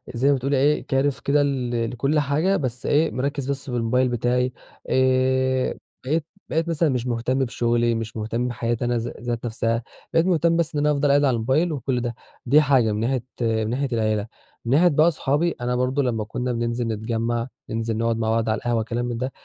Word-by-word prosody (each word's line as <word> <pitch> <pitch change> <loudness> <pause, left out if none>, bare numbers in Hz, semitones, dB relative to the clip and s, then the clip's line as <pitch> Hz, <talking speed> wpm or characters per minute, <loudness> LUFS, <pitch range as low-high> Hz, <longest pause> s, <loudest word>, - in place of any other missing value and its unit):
زي 135 +4 +2
ما 140 - +5
بتقولي 135 +1 0
إيه 145 +3 +2
كارف 135 0 +1
كده 145 +1 +2
ل 120 -4 -1
لكُلّ 140 +5 +1
حاجة 155 +7 +1
بس 125 -4 -3
إيه 155 +2 +2
مركّز 140 +1 -2
بس 140 0 -5
بالموبايل 125 +1 +1
بتاعي، 125 +1 0 0.4
آآ، 130 0 +2 0.3
بقيت 155 +3 0 0.2
بقيت 165 +2 0
مثلًا 165 -1 +2
مش 125 -2 -1
مهتم 125 +2 0
بشغلي، 120 -2 +1
مش 115 0 -5
مهتم 115 +3 -2
بحياتي 120 0 -2
أنا 120 0 +1
ذا 115 +1 -4
ذات 120 0 -3
نَفسها 115 0 -1 0.3
بقيت 165 +1 +4
مهتم 170 -2 +2
بس 165 -1 -1
إن - - +1
أنا 150 +1 +3
افضل 145 0 +1
قاعد 145 +1 +4
على 135 -3 +3
الموبايل 135 +10 +1
وكُلّ 130 -3 -1
ده، 120 -1 -3 0.3
دي 145 +5 +6
حاجة 135 -7 +3
من 105 - -2
ناحية 120 +2 0 0.2
من 110 -2 0
ناحية 135 +3 -1
العيلة، 110 -2 0 0.4
من 115 - -1
ناحية 175 +4 +6
بقى 160 +1 +4
صحابي 155 +3 0
أنا 125 +1 0
برضو 125 +3 +1
لمّا 120 -5 -1
كنّا 125 +4 -3
بننزل 120 0 -1
نتجمّع، 115 +2 -2 0.2
ننزل 115 0 -2
نقعُد 115 0 0
مع 110 -1 -1
بعض 115 0 +1
على 110 - +1
القهوة 120 -1 0
كلام 120 +2 -3
من 120 -1 -3
ده 130 +3 -3
125 Hz, 205 wpm, -23 LUFS, 115-140 Hz, 0.4 s, دي